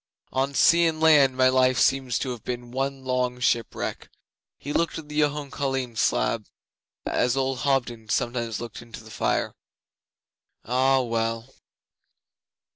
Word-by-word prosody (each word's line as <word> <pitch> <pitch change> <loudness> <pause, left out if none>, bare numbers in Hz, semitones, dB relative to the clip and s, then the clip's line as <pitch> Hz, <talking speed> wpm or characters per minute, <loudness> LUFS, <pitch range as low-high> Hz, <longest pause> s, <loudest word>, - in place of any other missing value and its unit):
On 135 +1 -1
sea 170 +3 +5
and 160 -1 -2
land 145 -5 +5
my 130 0 +5
life 130 0 +3
seems 135 -3 +2
to 130 - -3
have 120 -3 -8
been 120 -1 -5
one 135 +1 -3
long 125 -1 -1
shipwreck.' 120 -2 -1 0.5
He 145 - -6
looked 170 - 0
at 155 -2 -9
the 150 0 -2
Jhone 145 -1 -1
Coline 135 -4 -2
slab 110 0 0 0.6
as 125 +1 +1
old 135 -1 -1
Hobden 120 -6 -1
sometimes 120 -2 -1
looks 120 -2 -7
into 115 -1 -11
the 110 - -13
fire. - - -1 1.1
'Ah, 130 +3 +3
well! 115 +1 -2
130 Hz, 140 wpm, -25 LUFS, 120-135 Hz, 1.1 s, sea